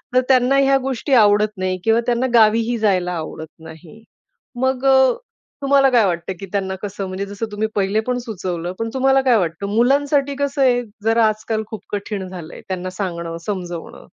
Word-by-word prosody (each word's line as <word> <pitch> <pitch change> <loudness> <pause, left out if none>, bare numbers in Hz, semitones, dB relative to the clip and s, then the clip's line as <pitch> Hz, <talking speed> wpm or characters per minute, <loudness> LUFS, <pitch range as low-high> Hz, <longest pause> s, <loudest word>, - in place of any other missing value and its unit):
तर 255 - +6
त्यांना 260 +1 +4
ह्या 275 0 +4
गोष्टी 270 +2 -2
आवडत 210 -2 +4
नाही 185 0 -1
किंवा 225 +1 +3
त्यांना 245 +1 +1
गावीही 230 +1 +4
जायला 185 -5 +1
आवडत 160 0 -7
नाही. 160 +6 -13 0.6
मग 260 0 0
अ, 265 -1 +5 0.5
तुम्हाला 275 -1 +4
काय 240 -5 +4
वाटतं? 175 +1 -2
की 195 - -6
त्यांना 190 -2 -2
कसं 200 -1 -5
म्हणजे 185 +1 -4
जसं 200 +3 -5
तुम्ही 210 +1 -1
पहिले 200 +2 +1
पण 250 - 0
सुचवलं, 180 -7 -4
पण 225 0 -2
तुम्हाला 270 0 +3
काय 250 -4 +3
वाटतं? 180 +2 -2
मुलांसाठी 280 +3 +2
कसं 280 0 -1
आहे 245 -2 +4 0.2
जरा 225 +1 +3
आज-काल 215 +1 -2
खूप 220 - -8
कठीण 200 -1 -4
झालंय. 175 -3 -9
त्यांना 185 -1 -4
सांगणं, 170 -3 -4
समजवणं 175 -5 -6
215 Hz, 175 wpm, -20 LUFS, 185-255 Hz, 0.6 s, तर